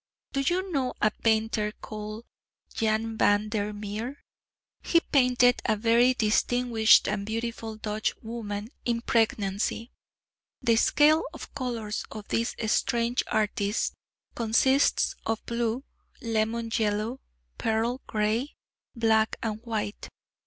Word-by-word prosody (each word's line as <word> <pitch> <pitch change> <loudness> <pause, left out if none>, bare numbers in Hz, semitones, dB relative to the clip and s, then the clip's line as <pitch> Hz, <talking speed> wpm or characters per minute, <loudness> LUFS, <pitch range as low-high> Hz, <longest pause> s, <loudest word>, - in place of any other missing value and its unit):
Do 275 - 0
you 360 +7 0
know 265 -5 -1
a 210 - +3
painter 220 -1 +1
called 215 +1 -7 0.5
Jan 220 0 -1
van 205 +1 +3
der 210 -1 -1
Meer? 210 +6 -5 0.6
He 335 - +3
painted 250 -5 +3
a 215 - +2
very 235 +4 +4
distinguished 230 0 +4
and 205 -1 -1
beautiful 225 +1 -4
Dutch 215 0 -2
woman, 220 -2 -5
in 235 -1 0
pregnancy. 220 0 0 0.7
The 230 -1 +2
scale 305 +6 +5
of - - -10
colours 235 -6 -3
of 215 -1 -9
this 230 +1 0
strange 235 +2 +1
artist 210 -1 0 0.4
consists 245 +5 +3
of 225 -1 -2
blue, 235 +2 -1 0.4
lemon 230 -1 -1
yellow, 215 +3 0 0.4
pearl 230 +3 0
grey, 220 +6 -1 0.4
black 220 -2 +2
and 220 -1 -3
white. 220 -3 -4
225 Hz, 115 wpm, -27 LUFS, 215-240 Hz, 0.7 s, scale